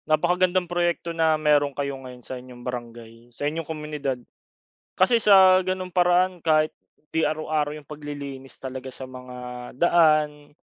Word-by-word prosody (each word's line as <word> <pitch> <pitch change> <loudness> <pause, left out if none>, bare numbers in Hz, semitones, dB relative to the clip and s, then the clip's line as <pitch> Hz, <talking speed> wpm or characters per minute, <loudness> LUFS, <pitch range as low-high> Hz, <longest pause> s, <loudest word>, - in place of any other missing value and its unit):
Napakagandang 180 +3 +2
proyekto 175 -1 -1
na 160 -1 +2
meron 145 -2 +2
kayo 140 -1 -2
ngayon 125 -2 -11
sa - - -6
inyong 125 -1 -13
barangay, 120 -1 -8
sa 120 +4 -6
inyong 155 +1 -3
komunidad. 150 -4 -3 0.8
Kasi 230 +6 +4
sa 190 -3 +7
gano'ng 185 0 -3
paraan 180 0 +3
kahit 155 -1 +2 0.4
'di 160 - +1
araw-araw 155 -1 -1
yung 150 - -11
paglilinis 145 -2 -8
talaga 130 0 -7
sa 130 0 -8
mga 125 -1 -10 0.4
daan, 155 -2 +2
150 Hz, 140 wpm, -24 LUFS, 135-175 Hz, 0.8 s, sa